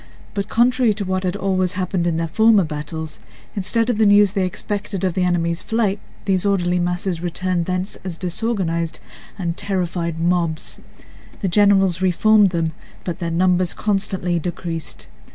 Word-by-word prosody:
But 200 Hz, 0 st, -3 dB
contrary 240 Hz, -1 st, +3 dB
to 200 Hz, -, -3 dB
what 185 Hz, 0 st, -1 dB
had 180 Hz, 0 st, -1 dB
always 190 Hz, -2 st, 0 dB
happened 185 Hz, -2 st, -1 dB
in 165 Hz, -2 st, 0 dB
their 165 Hz, 0 st, -1 dB
former 220 Hz, +3 st, +4 dB
battles, 155 Hz, 0 st, -5 dB, 0.4 s
instead 225 Hz, +3 st, +1 dB
of 240 Hz, -3 st, 0 dB
the 215 Hz, -, +5 dB
news 205 Hz, -1 st, +6 dB
they 195 Hz, -3 st, +1 dB
expected 200 Hz, 0 st, -4 dB
of 185 Hz, -2 st, +1 dB
the 185 Hz, -, -1 dB
enemy's 170 Hz, -1 st, 0 dB
flight, 215 Hz, -3 st, 0 dB, 0.3 s
these 190 Hz, -3 st, +1 dB
orderly 180 Hz, -3 st, +1 dB
masses 175 Hz, 0 st, -1 dB
returned 180 Hz, 0 st, -1 dB
thence 185 Hz, +1 st, -2 dB
as 180 Hz, -3 st, -5 dB
disorganized 175 Hz, -4 st, -2 dB, 0.4 s
and 170 Hz, -4 st, -2 dB
terrified 175 Hz, -4 st, -2 dB
mobs. 170 Hz, -2 st, 0 dB, 0.6 s
The 195 Hz, -, 0 dB
generals 195 Hz, -2 st, +4 dB
re 190 Hz, -, +3 dB
formed 210 Hz, +2 st, +5 dB
them, 165 Hz, -2 st, -1 dB, 0.3 s
but 175 Hz, 0 st, -4 dB
their 170 Hz, -2 st, -2 dB
numbers 180 Hz, +1 st, +2 dB
constantly 190 Hz, -4 st, 0 dB
decreased. 165 Hz, -1 st, -5 dB
185 Hz, 160 wpm, -21 LUFS, 170-200 Hz, 0.6 s, news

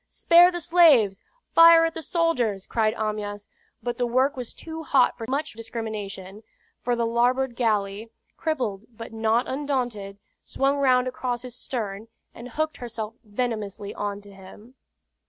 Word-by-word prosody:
"Spare 345 Hz, +1 st, +5 dB
the 350 Hz, -1 st, -5 dB
slaves! 310 Hz, -, +5 dB, 0.3 s
Fire 330 Hz, 0 st, +8 dB
at 325 Hz, -, -2 dB
the 325 Hz, -, -5 dB
soldiers!" 250 Hz, -, 0 dB
cried 220 Hz, -2 st, 0 dB
Amyas; 210 Hz, -1 st, -4 dB, 0.4 s
but 240 Hz, -1 st, -3 dB
the 245 Hz, -, +1 dB
work 260 Hz, +4 st, +2 dB
was 250 Hz, -3 st, -6 dB
too 320 Hz, 0 st, -8 dB
hot 270 Hz, -5 st, +3 dB
for 225 Hz, -, -7 dB
much 280 Hz, +4 st, -2 dB
discrimination, 215 Hz, -3 st, -6 dB, 0.4 s
for 245 Hz, -, 0 dB
the 235 Hz, 0 st, 0 dB
larboard 245 Hz, +2 st, +1 dB
galley, 215 Hz, -2 st, -1 dB, 0.3 s
crippled 235 Hz, -11 st, -3 dB
but 230 Hz, -1 st, -10 dB
not 225 Hz, +2 st, +1 dB
undaunted, 245 Hz, -8 st, -3 dB, 0.3 s
swung 275 Hz, +1 st, 0 dB
round 255 Hz, -2 st, +3 dB
across 250 Hz, -1 st, -3 dB
his 250 Hz, -2 st, -8 dB
stern, 220 Hz, -4 st, -5 dB, 0.3 s
and 235 Hz, +2 st, -10 dB
hooked 310 Hz, +5 st, -2 dB
herself 230 Hz, -2 st, -6 dB
venomously 210 Hz, -3 st, -4 dB
on 205 Hz, 0 st, -4 dB
to 205 Hz, 0 st, -15 dB
him. 195 Hz, +5 st, -14 dB
235 Hz, 150 wpm, -25 LUFS, 210-265 Hz, 0.4 s, Fire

